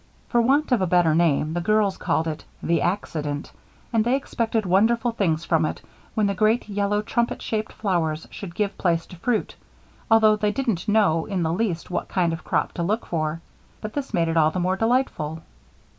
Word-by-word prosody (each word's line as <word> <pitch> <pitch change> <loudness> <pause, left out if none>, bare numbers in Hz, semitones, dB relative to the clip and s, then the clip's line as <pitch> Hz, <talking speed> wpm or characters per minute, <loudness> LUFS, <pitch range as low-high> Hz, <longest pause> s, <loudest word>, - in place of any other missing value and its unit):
For 240 - +3
want 280 +5 +2
of 245 -5 +3
a 185 - +1
better 175 -2 +3
name, 155 -2 +2
the 175 - -1
girls 210 +1 +2
called 160 - 0
it 155 -1 -4 0.2
"The 170 - +1
Accident," 155 -6 -2 0.4
and 225 -1 +3
they 240 +3 +2
expected 230 -5 -1
wonderful 225 +6 +3
things 170 -8 0
from 160 -1 +2
it 155 - -2 0.4
when 215 - +2
the 200 - +1
great 215 +4 +2
yellow 205 0 0
trumpet 235 +2 -1
shaped 220 -1 -3
flowers 165 -6 -1
should 175 -4 -8
give 200 -1 -2
place 170 -2 +1
to - - -12
fruit, 220 +5 -1 0.5
although 220 -1 +6
they 210 -1 +1
didn't 225 -7 -2
know 205 -7 +3
in 190 -4 -1
the 160 0 0
least 180 -4 -2
what - - -2
kind 175 -3 +1
of 165 - -6
crop - - 0
to - - -5
look 210 +7 -1
for. 155 -1 -2 0.4
But 215 -1 -6
this 285 -2 -4
made 170 -1 +1
it 165 0 0
all 155 -1 +5
the 180 - -3
more 185 +1 +1
delightful. 195 - 0
195 Hz, 200 wpm, -24 LUFS, 165-220 Hz, 0.5 s, although